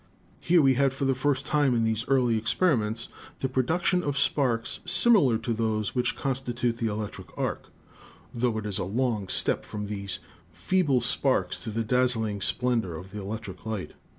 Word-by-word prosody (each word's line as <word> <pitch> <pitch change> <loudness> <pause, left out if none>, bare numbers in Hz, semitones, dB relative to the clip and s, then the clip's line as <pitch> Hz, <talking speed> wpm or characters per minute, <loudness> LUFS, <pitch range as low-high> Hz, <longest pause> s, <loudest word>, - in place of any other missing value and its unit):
Here 170 -2 +3
we 135 -1 +5
had 135 +1 +2
for 135 - -2
the 135 - +3
first 135 +1 -1
time 145 -4 +2
in 115 - +1
these 110 +1 0
early 125 -4 +2
experiments 115 -2 0 0.3
the 135 - +1
production 160 +8 +1
of 145 -4 -2
sparks 125 -5 +1
similar 185 - +5
to 115 +1 -3
those 110 -2 -1
which 125 -1 0
constitute 125 -3 -2
the 115 - 0
electric 105 -1 -5
arc; - - -3 0.6
tho 120 -2 0
it 110 - -4
is 105 -2 -2
a - - -1
long 110 +1 -1
step - - +1
from 105 -1 -6
these 100 -3 -4 0.3
feeble 135 - +1
sparks 130 +2 +1
to 115 - -6
the 115 +1 -2
dazzling 110 -3 +1
splendor 115 -5 0
of 90 +3 -9
the 105 0 -6
electric 100 -1 -7
light. 110 -4 -4
120 Hz, 175 wpm, -27 LUFS, 110-135 Hz, 0.6 s, we